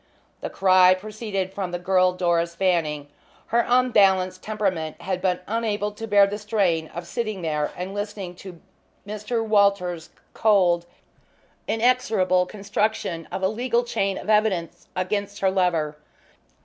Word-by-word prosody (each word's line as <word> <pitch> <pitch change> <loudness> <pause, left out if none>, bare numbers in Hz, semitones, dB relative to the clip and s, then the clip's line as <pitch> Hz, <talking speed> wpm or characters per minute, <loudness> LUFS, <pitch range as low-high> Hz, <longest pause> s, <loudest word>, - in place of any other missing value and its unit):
The - - -5
cry 185 -1 +5
proceeded 200 -1 -4
from 195 -2 -3
the 175 - -3
girl 185 +1 +3
Doris 170 -2 0
Fanning. 165 -6 0 0.5
Her 235 0 +4
unbalanced 195 -7 +3
temperament 190 -8 -2
had 185 0 -2
been 180 -1 0
unable 210 -2 -1
to 225 +2 -7
bear 205 -1 +6
the 205 +1 -4
strain 195 -7 0
of 170 +2 -8
sitting 215 -2 -4
there 150 -2 -1
and 185 +2 -5
listening 205 -3 -5
to 180 -3 -11 0.5
Mr. 215 +3 -3
Walters' 200 -6 +2 0.2
cold 180 -5 +3 0.8
inexorable 220 -6 +2
construction 200 -4 -2
of 190 - -4
a - - +4
legal 235 +3 0
chain 195 -5 -1
of - - -8
evidence 210 -6 0
against 200 +2 -2
her 190 -1 +3
lover. 170 -5 0
195 Hz, 135 wpm, -24 LUFS, 180-210 Hz, 0.8 s, bear